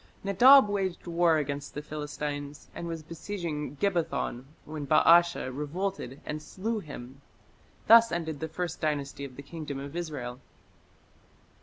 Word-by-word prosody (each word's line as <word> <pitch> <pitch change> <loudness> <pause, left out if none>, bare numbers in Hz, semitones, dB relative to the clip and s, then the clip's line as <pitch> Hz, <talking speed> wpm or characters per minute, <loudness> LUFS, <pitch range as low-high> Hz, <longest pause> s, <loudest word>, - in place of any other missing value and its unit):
Nadab 245 +6 +7
waged 195 -3 -2
war 170 -1 +3
against 145 -1 -4
the 150 - -3
Philistines, 145 -1 -5
and 170 - -6
was 165 -2 -5
besieging 160 -4 -5
Gibbethon 170 -9 -1 0.2
when 150 -2 -6
Baasha 165 -3 +5
revolted 150 -2 -3
and 150 0 -4
slew 215 +8 -3
him. 135 -5 -10 0.6
Thus 230 0 +8
ended 160 -4 -3
the 160 - -3
First 170 +1 -4
Dynasty 140 -2 -2
of 130 -2 -10
the 140 - -9
Kingdom 150 -1 -6
of 140 +3 -7
Israel. 140 -8 -5
155 Hz, 135 wpm, -29 LUFS, 145-175 Hz, 0.6 s, Thus